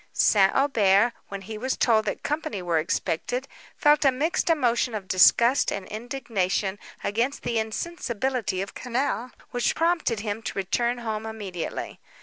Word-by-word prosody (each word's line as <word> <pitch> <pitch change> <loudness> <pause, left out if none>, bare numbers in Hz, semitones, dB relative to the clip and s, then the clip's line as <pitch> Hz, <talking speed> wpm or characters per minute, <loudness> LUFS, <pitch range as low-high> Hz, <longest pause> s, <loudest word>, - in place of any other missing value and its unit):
St. 195 -2 +4
Aubert, 230 -5 +3
when 200 -1 -6
he 215 +2 -7
was 260 +3 -1
told 220 -3 +3
that - - -3
company 295 -9 -2
were 170 -2 +1
expected, 245 +10 -2 0.3
felt 295 0 +4
a 270 - +5
mixed 320 +8 0
emotion 245 -6 +2
of 195 -3 -5
disgust 235 +8 +5
and 195 - -4
indignation 215 -5 -2 0.2
against 235 +7 -1
the 235 -2 0
insensibility 235 - -2
of 195 - -9
Quesnel, 250 0 -2 0.2
which 245 0 0
prompted 330 -10 +1
him 210 0 -3
to - - -5
return 235 +6 0
home 220 -2 -4
immediately. 200 -6 -5
230 Hz, 145 wpm, -25 LUFS, 200-260 Hz, 0.3 s, a